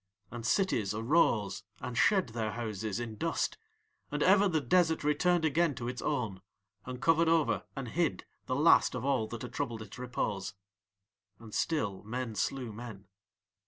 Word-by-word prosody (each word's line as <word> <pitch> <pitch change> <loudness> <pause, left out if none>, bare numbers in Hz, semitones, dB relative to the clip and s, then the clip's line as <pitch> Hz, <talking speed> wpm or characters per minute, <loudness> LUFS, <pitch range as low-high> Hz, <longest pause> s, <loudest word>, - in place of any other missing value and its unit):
"And 115 -1 -5
cities 115 - +1
arose 115 -4 +2 0.2
and 125 - -5
shed 190 - +3
their 110 -2 -3
houses 110 -2 -3
in 115 -3 -5
dust, - - -1 0.5
and 145 0 -1
ever 200 +2 +6
the 160 -4 +1
desert 160 +4 +2
returned 160 +3 +2
again 160 0 +2
to 120 - -5
its 125 -1 -4
own, 115 -10 -2 0.5
and 125 -1 -5
covered 165 +4 +3
over 165 -2 +2
and 135 -3 -4
hid 170 +6 0 0.2
the 130 - 0
last 150 -1 +5
of 125 0 -3
all 130 -6 +1
that 120 +1 -7
had 125 0 -7
troubled 120 -6 -3
its 105 +3 -11
repose. 110 -5 -3 0.8
"And 110 -1 -13
still 110 -12 -1
men 120 +2 -4
slew 125 +1 -2
men. 105 -4 -9
125 Hz, 160 wpm, -31 LUFS, 110-155 Hz, 0.8 s, ever